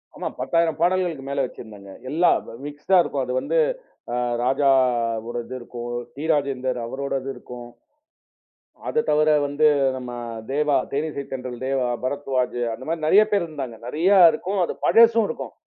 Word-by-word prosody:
ஆமா - - -4
10,000 165 -2 +1
பாடல்களுக்கு 175 -5 +1
மேல 140 0 0
வச்சிருந்தேங்க. 105 -5 -11 0.2
எல்லாம் 165 +5 +3 0.2
மிக்ஸ்ட்டா 150 +6 +1
இருக்கும். 140 -4 -2
அது 125 - -3
வந்து - - -1 0.6
ஆ - - -1 0.3
ராஜா 135 +2 +3 0.6
ஒரு 120 0 -3
இது 130 +2 -7
இருக்கும். 120 0 -7 0.3
டி. 145 - -6
ராஜேந்தர் 130 -4 -1
அவரோட 140 +4 -4
இது 135 - -5
இருக்கும். 125 -1 -10 1.2
அதத் 460 0 0
தவிர 155 +1 +3 0.2
வந்து 145 +2 +2 0.3
நம்ம 125 -1 -6 0.4
தேவா, 150 0 +1 0.2
தேனிசை 145 0 -2
தென்றல் 125 -1 -6
தேவா, 135 -2 0 0.2
பரத்வாஜ் 130 -2 -1
அந்தமாரி 155 +7 -4
நிறைய 200 +7 +6
பேர் 200 -4 +2
இருந்தாங்க. 135 -7 -6
நிறைய 160 +9 +1 0.2
இருக்கும். 190 +6 -3
அது - - -3
பழசும் 230 -1 +5
இருக்கும். - - -6
140 Hz, 145 wpm, -23 LUFS, 125-160 Hz, 1.2 s, நிறைய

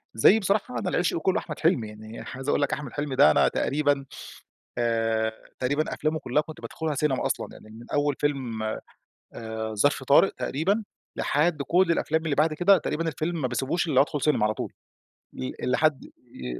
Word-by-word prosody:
زي 195 - +6
بصراحة 195 - 0
أنا - - -2
العشق 175 -1 +1
كلّه 190 +5 +1
أحمد - - -7
حلمي، 150 - +2
يعني 110 +1 -10
عايز 135 +2 -6
أقول - - +2
لك 145 - +1
أحمد 145 -4 -5
حلمي 145 -2 -3
ده 75 - +7
أنا - - +4
تقريبًا 145 -1 0 0.7
آآ، 115 -1 +1 0.3
تقريبًا 145 +4 0
أفلامه 155 +1 -1
كلّها 145 +2 +1
كنت 155 0 -11
بادخلها 160 -2 -3
سينما 140 -1 0
أصلًا، - - -2
يعني 110 - -14
من 115 +2 -12
أوّل 145 -1 +2
فيلم 130 -7 -1 0.7
آآ، 110 -1 -5
ظرف 140 +5 +2
طارق 145 +9 +5
تقريبًا، 195 +10 -1 0.3
لحد 150 0 +1
كل 180 +5 +3
الأفلام 160 0 0
اللي 150 -3 0
بعد 155 +1 +3
كده، 180 +4 +5
تقريبًا 165 +2 -2
الفيلم 160 +2 -2
ما 130 - +1
باسيبوش 135 +8 -1
إلا 155 - -2
أمّا 130 - +7
أدخل 145 -1 -3
سينما 145 -8 +2
على 110 0 +1
طول - - -5 0.6
ل 65 0 -4 0.2
لحد 155 +1 +2
ي 65 - -9
145 Hz, 185 wpm, -26 LUFS, 120-160 Hz, 0.7 s, ده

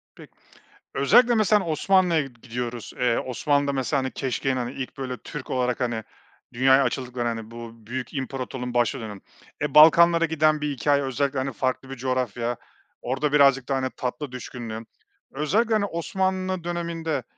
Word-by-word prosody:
Pek - - -14 0.7
Özellikle 235 - +5
mesela 210 -2 +3
Osmanlı'ya 170 +1 +3
gi 135 -3 -8
gidiyoruz. 120 -1 -5
Eee, 120 -2 +2
Osmanlı'da, 140 +2 0
mesela, 135 +1 0
hani, 130 - -3
keşkeğin, 135 +1 -1
hani, 125 0 -3
ilk, 130 -2 -6
böyle, 130 -2 -4
Türk 150 +2 -8
olarak, 125 -1 0
hani, 120 -3 -1 0.5
dünyaya 130 +2 +5
açıldıklarını, 125 -1 -2
hani, 115 -1 -6
bu 115 -1 -10
büyük 130 +1 -5
imparatorluğunun 130 -2 -4
başladığı 120 +1 +1
dönem. 105 -3 -8 0.4
E, 150 -2 -1
Balkanlara 170 +2 +7
giden 155 -1 +2
bir 150 - -1
hikâye 140 +1 +1
özellikle, 135 +1 -1
hani, 135 0 -2
farklı 130 +2 -2
bir 135 - -6
coğrafya 120 -2 -2 0.4
orada 135 +4 -1
birazcık 140 -3 +4
daha, 135 - +1
hani, 130 0 -1
tatlı 130 +2 -4
düşkünlüğü. 120 -3 -6 0.5
Özellikle, 200 - +1
hani, 215 -2 +2
Osmanlı 185 0 -2
döneminde, 165 -4 -3
135 Hz, 155 wpm, -25 LUFS, 125-155 Hz, 0.7 s, Balkanlara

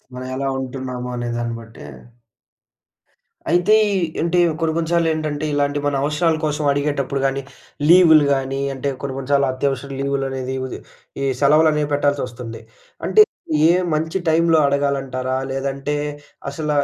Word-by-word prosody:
మనం 130 0 -6
ఎలా 135 +1 -2
ఉంటున్నామో 130 -1 -5
అనేదాన్ని 120 -1 -3
బట్టే 110 -10 -12 1.6
అయితే, 175 +5 +4 0.2
ఈ - - +1 0.3
అంటే, 170 +1 +1 0.2
కొన్ని, 160 -1 +1
కొన్ని 165 -1 -1
సార్లు 170 -1 +3
ఏంటంటే, 155 -1 -3
ఇలాంటి 145 0 0
మన 145 - +1
అవసరాల 155 +3 +1
కోసం 150 0 -1
అడిగేటప్పుడు 140 -1 -1
గాని, 135 0 0 0.5
లీవులు 165 -4 +7
గాని, 135 0 -2
అంటే 135 +2 -3
కొన్ని, 140 -1 -4
కొన్ని 135 0 -6
సార్లు 140 -1 +4
అత్యవసర 140 +1 -2
లీవులు 140 0 -1
అనేది 130 0 -4
వుది 130 - -6 0.4
ఈ - - 0 0.2
సెలవులనేవి 150 +1 +4
పెట్టాల్సి 145 0 +1
వస్తుంది. 115 -2 -8 0.5
అంటే, 430 - +7 0.5
ఏ - - +6 0.2
మంచి 160 +4 -1
టైమ్‌లో 165 0 +4
అడగాలంటారా? 135 -2 -1
లేదంటే, 135 +2 -2 0.5
అసల 150 +1 -4
140 Hz, 140 wpm, -20 LUFS, 130-155 Hz, 1.6 s, లీవులు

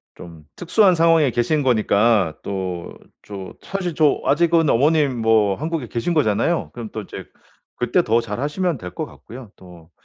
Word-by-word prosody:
좀 85 -3 -12
특수한 185 +1 +3
상황에 165 -5 +3
계신 140 +6 0
거니까 110 - +2
또 95 -3 -5 0.3
저 95 -2 -8
사실 180 -5 -4
저 150 -3 +2
아직은 165 0 +2
어머님 145 0 +2
뭐 110 -3 +3
한국에 155 -3 -4
계신 120 +11 -2
거잖아요. 145 +3 0
그럼 115 -3 -7
또 110 - -4
이제 - - -9 0.5
그때 - - +1
더 115 +2 +2
잘하시면 145 - -2
될 90 -4 -8
것 - - -3
같고요. 120 -2 -13
또 85 -3 -16
120 Hz, 305 characters per minute, -20 LUFS, 100-160 Hz, 0.5 s, 특수한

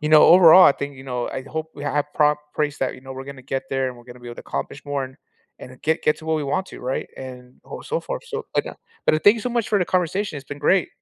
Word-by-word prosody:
you 150 - -2
know, 155 0 +8
overall, 180 +1 +9
I - - +8
think, 140 0 -6
you 130 - -11
know, 125 -2 -3
I 130 - -5
hope 160 +3 -5
we 145 - -9
have 145 0 0
prop 150 -1 +3 0.2
praise 150 -2 -1
that, 130 - -1
you - - -13
know, 130 0 -9
we're 130 0 -7
gonna 140 -1 -10
get 135 0 -3
there, 135 -1 0
and 125 - -8
we're 120 - -16
gonna 125 0 -13
be 120 - -10
able 120 - -8
to - - -8
accomplish 145 - -5
more 145 -1 -2
and 130 0 -12 0.4
and 130 0 -12
get 160 +2 0
get 150 - +2
to - - -13
what 160 0 +1
we 150 - -2
want 145 +7 -1
to, - - -11
right, 130 +1 -3
and 125 -1 -10
oh - - -8
so 480 - -2
forth. - - -5
So, 455 -2 -6
like, - - +2
uh, - - -7 0.3
but 155 0 +3
thank 205 - +8
you 230 - -5
so 250 - -2
much 235 -2 -1
for 210 - +2
the - - +2
conversation. 185 0 -1
It's 140 -1 -9
been 145 - -7
great. 180 +4 +3
145 Hz, 305 wpm, -22 LUFS, 130-170 Hz, 0.4 s, overall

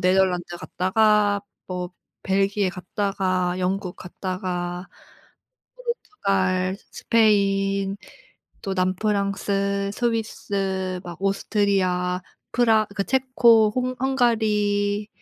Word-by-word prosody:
네덜란드 180 -2 +2
갔다가 205 +2 +2 0.3
뭐 180 0 -4 0.3
벨기에 195 0 +1
갔다가 185 -1 -1
영국 185 0 -1
갔다가 180 -1 -4 0.9
포르투갈 195 - -1
,스페인 195 -3 +2 0.6
또 195 - -3
남프랑스, 200 +1 0
스위스 195 -5 -2
막 175 -1 -8
오스트리아 195 -2 +1 0.3
프라 225 -3 +3
그 200 - 0
체코 240 -5 +4
홍 255 0 -1
헝가리 210 -5 +1
195 Hz, 195 characters per minute, -24 LUFS, 185-215 Hz, 0.9 s, 체코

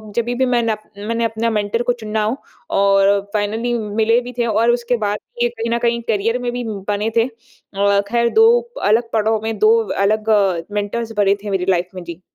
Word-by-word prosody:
जभी 240 +1 0
भी 260 +1 +1
मैन 240 -2 +1 0.4
मैंने 230 0 -1
अपने 225 +1 -1
मेंटर 210 +1 -1
को 245 - +1
चुनना 215 0 -2
हो 225 +6 -1 0.4
और 195 0 +4
फाइनली 220 +3 -1
मिले 220 +2 +1
भी 250 +1 -8
थे 235 - +2
और 230 +2 +2
उसके 240 0 0
बाद 210 -1 -1
भी 240 - -6
ये - - +1
कहीं 230 -1 -5
न - - -1
कहीं 235 0 0
करियर 225 +3 0
में 240 -1 -2
भी 245 0 -3 0.3
बने 205 +2 0
थे। 230 - +4
अ, 200 -4 -2
खैर 235 0 +2
2 445 0 +6 0.4
अलग 230 +2 +2
पड़ाव 220 0 +1
में 225 0 -3
2 435 +1 +5 0.3
अलग 215 +2 +1
अ, 195 -5 +3
मेंटर्स 210 +3 -3
बने 200 -1 +3
थे 205 - -5
मेरी 190 -2 -1
लाइफ 180 -1 +1
में। 180 - -6
जी। 170 +1 -9
220 Hz, 210 wpm, -19 LUFS, 205-235 Hz, 0.4 s, 2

